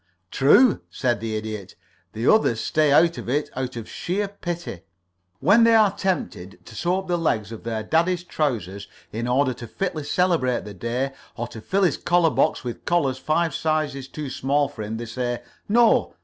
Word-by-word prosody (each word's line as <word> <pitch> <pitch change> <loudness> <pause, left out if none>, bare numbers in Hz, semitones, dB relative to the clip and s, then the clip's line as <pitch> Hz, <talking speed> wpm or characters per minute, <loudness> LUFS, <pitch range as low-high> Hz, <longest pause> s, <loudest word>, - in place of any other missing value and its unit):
"True," 200 - +5
said 120 -4 -1
the 110 0 -3
Idiot. 105 -3 -6 0.4
"The 110 +2 -3
others 170 - +4
stay 150 +4 +2
out 165 +3 +4
of - - -7
it 145 +3 -1
out 130 -1 -3
of 115 -2 -6
sheer 200 +4 -2
pity. 175 - -6 0.6
When 230 +3 +5
they 230 0 +6
are 210 -3 +4
tempted 95 - -3
to - - -12
sew 175 +2 0
up 190 0 -5
the 175 -1 0
legs 110 -10 0
of 115 - -8
their 110 -1 -3
daddy's 170 +7 +1
trousers 105 - -2 0.2
in 115 +2 -3
order 130 +1 +2
to 120 0 -9
fitly 160 - -3
celebrate 150 - +1
the 105 - -8
day, 120 +7 -2 0.3
or 120 0 -3
to 110 - -9
fill 195 - 0
his 175 -6 +2
collar 175 -2 +2
box 125 - +1
with 120 -2 -6
collars 140 -7 +1
five 165 +3 0
sizes 150 -4 -1
too 145 -1 -6
small 140 +2 +1
for 140 -5 -9
him, 110 +1 -4
they 120 - -5
say, 120 +1 -3 0.3
'No. 235 +2 +4
140 Hz, 190 wpm, -23 LUFS, 115-175 Hz, 0.6 s, they